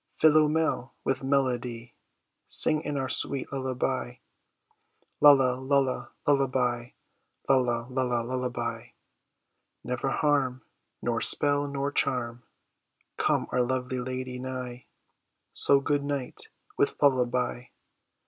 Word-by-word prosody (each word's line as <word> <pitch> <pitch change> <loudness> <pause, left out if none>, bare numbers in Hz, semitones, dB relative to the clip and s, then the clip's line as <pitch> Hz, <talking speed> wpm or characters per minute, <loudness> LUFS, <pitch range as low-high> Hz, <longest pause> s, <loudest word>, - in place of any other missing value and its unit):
Philomel, 155 -3 +2
with 135 0 -1
melody 125 -4 -1 0.5
Sing 155 -1 +2
in 145 -2 -4
our 135 -1 -2
sweet 140 +1 +1
lullaby; 130 - -2 1.1
Lulla, 135 -3 +6
lulla, 135 -1 0
lullaby; 130 -4 +1 0.6
lulla, 125 -3 +2
lulla, 125 -2 -1
lullaby! 120 -2 -4 1.0
Never 125 +2 -2
harm, 135 -4 0 0.4
Nor - - -1
spell 145 0 +3
nor 140 0 -3
charm, 120 -4 0 0.8
Come - - +1
our 125 - +1
lovely 130 0 -2
lady 130 0 -5
nigh; 125 -1 -6 0.7
So, 140 - +5
good 145 +1 0
night, 140 -3 -5 0.3
with - - +2
lullaby. 125 -2 +1
130 Hz, 100 wpm, -27 LUFS, 125-140 Hz, 1.1 s, Lulla